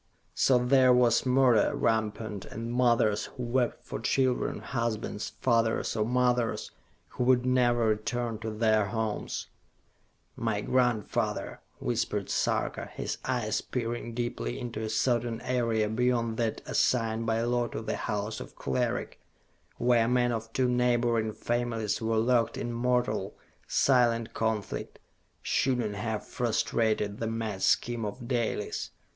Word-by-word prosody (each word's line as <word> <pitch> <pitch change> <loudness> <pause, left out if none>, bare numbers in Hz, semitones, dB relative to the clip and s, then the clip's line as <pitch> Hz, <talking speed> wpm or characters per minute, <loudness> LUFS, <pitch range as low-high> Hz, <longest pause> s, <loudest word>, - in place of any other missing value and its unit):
So 130 - +4
there 130 +1 +5
was 125 0 +4
murder 125 -4 +4
rampant, 110 -2 -1
and 115 +2 -5
mothers 115 -4 +3
who 125 - -8
wept 120 0 -1
for - - -5
children, 130 -2 +1
husbands, 115 -3 -3
fathers 115 -3 +1
or 110 - +1
mothers, 125 -1 +1 0.4
who - - -3
would 125 -1 +4
never 120 -2 +3
return 115 +1 -1
to 110 0 -4
their 110 -1 +2
homes. 110 0 -3 0.9
"My 110 -3 -1
grandfather," 120 -4 0 0.2
whispered - - -2
Sarka, - - 0
his - - -5
eyes 120 -4 0
peering 120 -1 -4
deeply 120 - -3
into 115 -3 -5
a 110 - -3
certain 115 +1 0
area 115 -4 +1
beyond 115 0 0
that 115 -2 -1
assigned 115 -2 +1
by 115 0 +1
law 120 0 +1
to 110 - -6
the - - -2
House 105 +2 -3
of - - -10
Cleric, 65 -1 -2 0.6
where 120 -1 +3
men 125 0 +2
of 115 -1 -4
two 130 +2 +1
neighboring 120 -2 +2
families 115 -2 -2
were 110 0 0
locked 115 +1 +2
in 120 - -3
mortal, 125 +1 0 0.3
silent 120 -4 +2
conflict, 110 -3 -2 0.5
"should 130 -2 +1
not 110 -4 -1
have 105 +1 -3
frustrated 110 -3 0
the 115 - -2
mad 110 -3 -3
scheme 120 +2 +2
of 115 +4 -5
Dalis! 120 -3 -2
115 Hz, 135 wpm, -29 LUFS, 110-125 Hz, 0.9 s, there